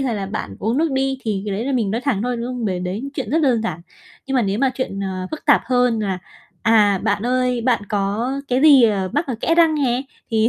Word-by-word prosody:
hay 255 -4 -1
là 195 -2 -3
bạn 145 - -5
uống 230 +6 -1
nước 325 -1 +1
đi, 265 0 0
thì 205 -3 -2
cái 200 - -2
đấy 220 +4 -3
là 275 - -1
mình 225 -6 0
nói 230 - -1
thẳng 250 -7 -1
thôi, 245 0 -1
đúng 235 +1 -4
không? 250 -2 -4
Bởi 185 -3 -1
đấy 205 +10 -4
chuyện 270 - -4
rất 320 - +2
đơn 240 -5 +2
giản. 170 -7 -3 0.5
Nhưng 270 - -3
mà 250 - +3
nếu 200 +1 -1
mà 270 -1 +2
chuyện, 200 -7 -4
ờ, 185 -1 -4
phức 310 - -7
tạp 290 - +5
hơn 250 -2 +2
là, 195 -3 -2 0.4
à, 210 -3 +4
bạn 215 +4 0
ơi, 250 -1 +1
bạn 240 -2 +1
có 205 +5 -1 0.2
cái 255 +1 +1
gì, 290 -4 +7
ờ, 200 -5 +2
mắc 295 +3 0
ở 255 - -2
kẽ 330 - +2
răng 330 -2 +4
nè 260 -3 0 0.3
thì 225 0 +3
235 Hz, 265 wpm, -20 LUFS, 205-265 Hz, 0.5 s, gì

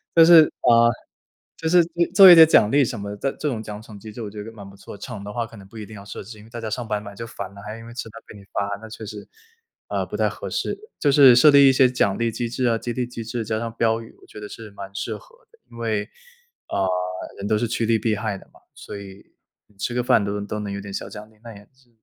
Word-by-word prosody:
就 165 -1 +8
是， 165 -2 +9 0.2
啊， 120 - +4 0.9
就 160 - -3
是 175 0 +6
做 - - -16 0.2
做 190 -1 +11
一 - - +11
点 160 -1 +9
奖 105 -8 +4
励 140 0 +4
什 115 -2 -5
么 100 0 -6
的， 105 - -7
但 135 - -1
这 150 - -1
种 115 -4 -3
奖 105 0 -8
惩 110 -2 -12
机 110 0 -10
制 115 - -9
我 105 - -5
觉 105 0 -8
得 115 - -9
蛮 100 -3 -11
不 100 - -15
错， 100 - -11
惩 115 -6 -7
的 105 - -7
话 120 -1 -2
可 115 - -14
能 95 -1 -13
不 110 - -14
一 105 - -7
定 110 - -12
要 100 - -10
设 - - -8
置， 110 -1 -11
因 105 - -14
为 - - -17
大 120 0 -7
家 110 - -4
上 115 +2 -4
班 105 -2 -2
嘛 100 -1 -9
就 115 +3 -7
烦 100 -3 -8
了， 100 - -11
还 105 +1 -7
因 115 - -12
为 120 - -11
吃 120 -2 -6
饭 115 +2 -12
被 105 - -12
你 100 - -14
罚， 100 0 -3
那 110 - -10
确 110 0 -9
实， 105 -1 -9 0.6
呃， - - -1
不 - - -6
太 - - +2
合 - - -7
适。 - - -2 0.2
就 145 - +2
是 135 -3 +8
设 150 +5 +7
立 140 -1 +7
一 - - +4
些 130 -1 +5
奖 110 -6 0
励 115 -1 0
机 120 +1 -3
制 125 +1 -2
啊， 115 - +2
激 120 +1 -5
励 125 0 -2
机 120 -2 -7
制， 115 0 -4
加 110 0 -2
上 115 -1 -4
标 115 0 +1
语， 115 - -14
我 - - -17
觉 - - -11
得 105 0 -8
是 110 -2 -10
蛮 100 -1 -10
适 - - -3
合 - - -20 0.2
的。 460 - -25
因 115 - -13
为， 110 -2 -2 0.6
呃， 95 -1 0 0.5
人 100 - -4
都 110 0 +2
是 120 +1 -1
趋 115 0 -1
利 115 0 +2
避 110 0 0
害 105 -1 -3
的 - - -18
嘛， - - -21 0.2
所 100 - -9
以 100 0 -12 0.5
吃 120 - -2
个 125 - 0
饭 115 -3 +3
都 100 - -2
能 100 0 -5
都 105 - -4
能 100 -1 -5
有 100 - -5
点 100 0 -9
小 - - -5
奖 105 0 -10
励， 110 - -25
那 115 - -10
也 100 - -13
是， 130 -2 -29
110 Hz, 325 characters per minute, -22 LUFS, 105-120 Hz, 0.9 s, 做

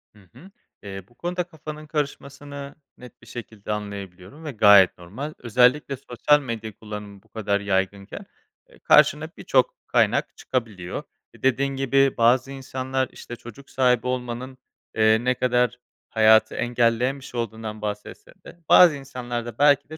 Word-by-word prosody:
Hı - - -18 0.2
hı. 190 +3 -15 0.3
Eee, 95 -2 -7
bu 120 - -26
konuda 180 +1 -2
kafanın 155 -2 -10
karışmasını 140 -1 -5 0.2
net 125 -2 -14
bir 115 - -18
şekilde 110 -3 -8
anlayabiliyorum 100 - -7
ve 150 - -4
gayet 100 -4 +6
normal. 120 - -7
Özellikle 125 +4 +2
sosyal 140 +4 +2
medya 115 -4 -5
kullanımı 105 -2 -9
bu 110 - -29
kadar 100 -2 -1
yaygınken, 100 - -2 0.4
eee, 465 - -20
karşına - - +4
birçok - - +1
kaynak - - +1
çıkabiliyor. 105 -8 -4 0.3
E, - - -19
dediğin 135 +1 +1
gibi 135 0 +2
bazı 125 +3 +3
insanlar, 130 -1 -3
işte, 120 - -9
çocuk 120 +4 -13
sahibi 125 -2 +2
olmanın, 125 +1 -4 0.4
eee, 110 +1 +4
ne 125 0 +2
kadar 125 -1 +1 0.3
hayatı 110 0 +4
engelleyen 120 +3 +1
bir 130 - -12
şey 120 - -6
olduğundan 110 -1 -5
bahsetse 105 0 -6
de 170 - -13
bazı 170 -5 +8
insanlar 120 -3 -5
da 120 -2 -8
belki 145 0 +4
de 155 - -8
120 Hz, 150 wpm, -24 LUFS, 110-135 Hz, 0.4 s, bazı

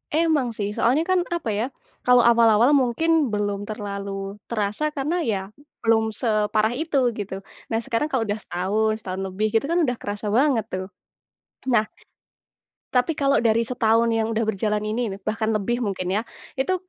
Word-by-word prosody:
Emang 315 -6 +2
sih 205 -1 -1
soalnya 265 +8 +3
kan, 370 -1 +4
apa 340 -9 -2
ya, 215 +4 0 0.4
kalau 250 -1 +6
awal-awal 235 +2 +5
mungkin 285 +3 +2
belum 205 -1 -1
terlalu 200 -1 -5
terasa 215 +7 -1
karena 300 +6 -1
ya 210 -8 0 0.4
belum 220 -1 +3
separah 215 -1 +1
itu 310 0 -1 0.2
gitu. 200 -2 -5 0.4
Nah, 225 - +1
sekarang 240 +6 0
kalau 255 -4 +1
udah 205 +1 -2
setahun, 210 +5 0
setahun 190 0 -4
lebih, 210 +4 -1
gitu 225 +4 +2
kan 345 +1 +2
udah 245 -1 -1
kerasa 205 +1 -4
banget 250 -4 +3
tuh. 185 0 -3 0.8
Nah, 220 -3 +4 1.1
tapi 250 +6 +3
kalau 275 0 +3
dari 230 0 +3
setahun 230 -1 +2
yang 225 0 +1
udah 225 +1 0
berjalan 210 +1 0
ini 220 +3 -1
nih, - - -18
bahkan 220 0 -1
lebih 240 +4 -1
mungkin 185 -4 -2
ya, 220 - +1 0.4
itu, 370 +8 +1
225 Hz, 165 wpm, -23 LUFS, 210-250 Hz, 1.1 s, kalau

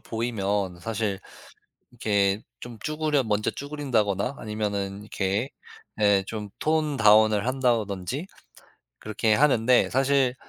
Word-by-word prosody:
보이면 100 -6 -2
사실 105 -2 -2 0.7
이렇게 100 -3 +1 0.2
좀 120 -2 -9
쭈그려 155 -3 0
먼저 105 -1 0
쭈그린다거나 130 -6 -1
아니면은 100 -2 -3
이렇게 105 +3 -2 0.5
예 100 -2 +4
좀 105 -2 -5
톤 155 -1 0
다운을 110 -2 +5
한다든지 120 - -1 0.7
그렇게 110 +1 0
하는데 125 -1 +4
사실 135 -1 +2
110 Hz, 255 characters per minute, -25 LUFS, 100-130 Hz, 0.7 s, 다운을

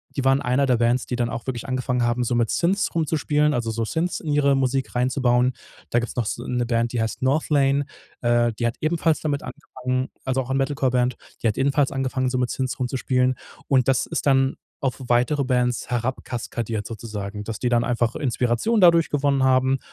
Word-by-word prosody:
die 135 - -1
waren 135 +1 +4
eine 125 +3 +2
der 125 -3 +2
Bands, 120 +2 +1
die 125 - -3
dann 120 -1 -1
auch 115 - -5
wirklich 125 -1 -4
angefangen 130 -1 -1
haben, 120 +1 +1
so 120 - -1
mit 120 -1 +1
Synths 190 +4 +1
rumzuspielen, 150 -2 +1
also, 120 -2 -1
so 115 0 -2
Synths 170 +8 -1
in 155 - -4
ihre 140 -1 +3
Musik 135 0 -1
reinzubauen. 125 0 +2 0.4
Da 120 - +3
gibt's 120 - -5
noch 120 - 0
so - - -3
'ne 125 -1 -1
Band, 115 0 0
die 120 - 0
heißt 110 - -3
Northlane 140 0 +2 0.4
äh, 120 0 +2
die 120 - -3
hat 120 - 0
ebenfalls 160 0 +1
damit 145 -2 -2
angefangen, 130 -3 -4 0.2
also, 130 0 0
auch 125 - -8
ein 135 - +1
Metalcore-Band 130 -2 +1 0.3
die - - +3
hat 105 - 0
ebenfalls 140 +1 +2
angefangen, 130 -1 -1
so 130 - -1
mit 125 - 0
Synths 130 0 -3
rumzuspielen. 130 0 0 0.3
Und 130 -3 +3
das 135 -2 +2
ist - - -3
dann 135 -1 +3 0.2
auf 135 -2 -1
weitere 125 +4 +2
Bands 125 -2 0
herab 125 +2 -2
kaskadiert 115 -3 -4
sozusagen, 105 -2 -6
dass 110 0 -5
die 125 - -1
dann 120 -1 +2
einfach 120 -1 0
Inspiration 130 - 0
dadurch 170 -2 +5
gewonnen 140 -2 +1
haben. 130 0 +3
130 Hz, 200 wpm, -23 LUFS, 120-135 Hz, 0.4 s, dadurch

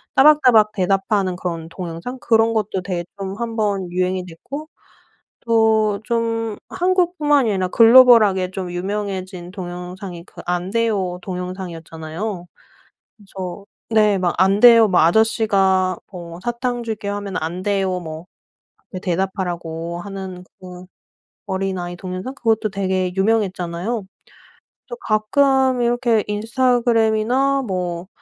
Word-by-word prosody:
따박따박 255 -7 +6
대답하는 195 0 0
그런 170 -3 -5
동영상 175 +8 -6
그런 225 -1 +3
것도 210 -3 -1
되게 180 -2 -3
좀 195 -1 -5
1 235 -1 -4
번 200 -5 -1
유행이 185 0 -1
됐고 275 - -8 0.7
또 220 -3 +2
좀 230 -2 -1
한국뿐만이 345 - +2
아니라 190 -2 0
글로벌하게 225 -4 +6
좀 185 -2 -5
유명해진 185 -1 -4
동영상이 180 -1 -7
그 - - -12
"안 180 +1 -1
돼요." 205 -6 0
동영상이었잖아요. 180 0 -6 0.7
그래서 195 -1 -8 0.2
네 215 -3 +3
막 180 -2 0
"안 190 +2 +3
돼요." 230 -2 +8
뭐 180 - +3
"아저씨가 190 -1 +2
뭐 170 -2 -9
사탕 240 0 -2
줄게." 220 -3 -5
하면 200 -1 -4
"안 170 +3 -4
돼요." 190 -2 0
뭐 160 0 -8 0.8
대답하라고 175 -2 -3
하는 190 -1 -7 0.2
그 180 -1 -10 0.6
어린아이 190 -2 -3
동영상 185 +7 -6
그것도 225 -3 0
되게 190 -2 -1
유명했잖아요. 195 0 -1 0.8
또 485 - -6
가끔 260 +4 +2
이렇게 240 -2 +2
인스타그램이나 240 +3 +1
뭐, 180 -4 -3
195 Hz, 270 characters per minute, -20 LUFS, 180-225 Hz, 0.8 s, 돼요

